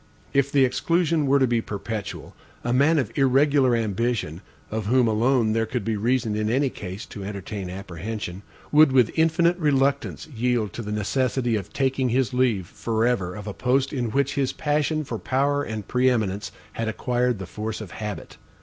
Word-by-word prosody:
If 140 0 +2
the 135 -2 +5
exclusion 165 +2 +1
were 140 +1 +4
to 135 - +4
be 120 -2 +1
perpetual, 105 0 -6 0.3
a 120 - 0
man 145 +6 +4
of 130 -8 -1
irregular 135 -1 +4
ambition, 110 -6 -1 0.3
of 110 -1 -3
whom 125 +1 +4
alone 115 +1 +2
there 115 0 0
could 115 -3 -3
be 115 - 0
reason 115 0 0
in 105 0 0
any 135 +3 +1
case 95 +2 -7
to 100 - -8
entertain 100 -1 -5
apprehension, 95 +1 -6 0.3
would, 150 -1 +6
with 125 -4 +4
infinite 170 +2 +3
reluctance, 140 -2 +1
yield 120 - -1
to - - -5
the 105 -2 -5
necessity 120 +3 0
of 100 -4 -4
taking 130 -1 0
his 130 +1 +1
leave 120 -7 +1
forever 110 -2 -1
of 105 -1 -8
a 105 - -4
post 130 +4 +1
in 125 -4 -1
which 140 +3 +1
his 135 -2 0
passion 150 +1 0
for - - -5
power 140 +2 +1
and 110 -6 -5
pre 125 +1 +3
eminence 105 -4 -1 0.2
had 115 - -3
acquired 125 +1 0
the 95 - -6
force 110 +4 -5
of 110 -5 -8
habit. 105 -2 -6
120 Hz, 180 wpm, -24 LUFS, 105-135 Hz, 0.3 s, would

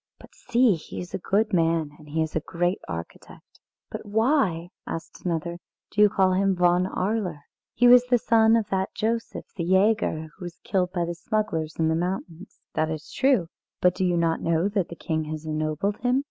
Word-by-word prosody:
But - - -16
see, 245 -2 +2
he 165 - -7
is 180 - -8
a - - -2
good 210 +4 0
man, 165 -3 +2
and 150 -1 -15
he 160 +2 0
is 160 - -6
a - - +2
great 175 +4 -1
architect." 85 0 -9 0.3
"But - - -6
why," 215 - +1 0.2
asked 165 - -7
another, 170 0 -2 0.3
"do 210 - +1
you 210 - +7
call 190 -1 +2
him 195 0 +2
Von 180 +1 +3
Arler? 190 -5 -2 0.3
He 245 - +5
was 245 0 +7
the 245 0 +4
son 225 -1 +4
of 225 -3 +1
that 190 0 -1
Joseph 230 +1 -2
the 170 - -3
Jäger 190 -3 +2
who 180 - -7
was 175 -1 -8
killed 180 -2 0
by 175 -2 -1
the 170 - -3
smugglers 170 -5 -2
in 160 - +1
the 160 - +2
mountains." 180 +1 -4
"That 155 0 0
is 155 0 -6
true. 260 -9 +2 0.3
But 180 -1 +4
do 190 - -2
you 175 -1 +2
not 165 -1 +1
know 165 +2 +1
that 200 -4 -1
the 170 - -7
king 160 0 -2
has 155 0 -6
ennobled 155 +6 -1
him? 250 +1 +2
180 Hz, 200 wpm, -25 LUFS, 165-210 Hz, 0.3 s, you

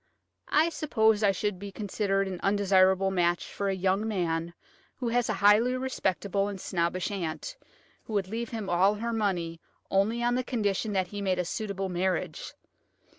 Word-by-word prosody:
I 315 +3 +4
suppose 220 -10 +2
I 205 -2 +4
should 195 0 -2
be 200 0 -7
considered 195 -1 -1
an 185 -2 -5
undesirable 190 -1 +3
match 175 -2 +1
for 200 -1 -1
a 195 - 0
young 190 +3 +1
man 170 -4 -1 0.4
who 245 -3 -3
has 240 0 +1
a - - +2
highly 230 +5 +5
respectable 200 -6 -1
and 200 -2 -5
snobbish 175 +1 -1
aunt, 195 - -4 0.5
who 220 - -7
would 200 -3 0
leave 230 +3 -4
him 220 -4 -5
all 190 +4 +3
her 230 +2 -3
money 175 -7 -1 0.3
only 215 +5 +2
on 240 0 +2
the 255 +1 0
condition 215 -3 -1
that 185 -2 0
he 205 -1 -5
made 190 -2 0
a 180 - 0
suitable 195 0 -3
marriage. 180 -2 -2
195 Hz, 175 wpm, -28 LUFS, 185-220 Hz, 0.5 s, highly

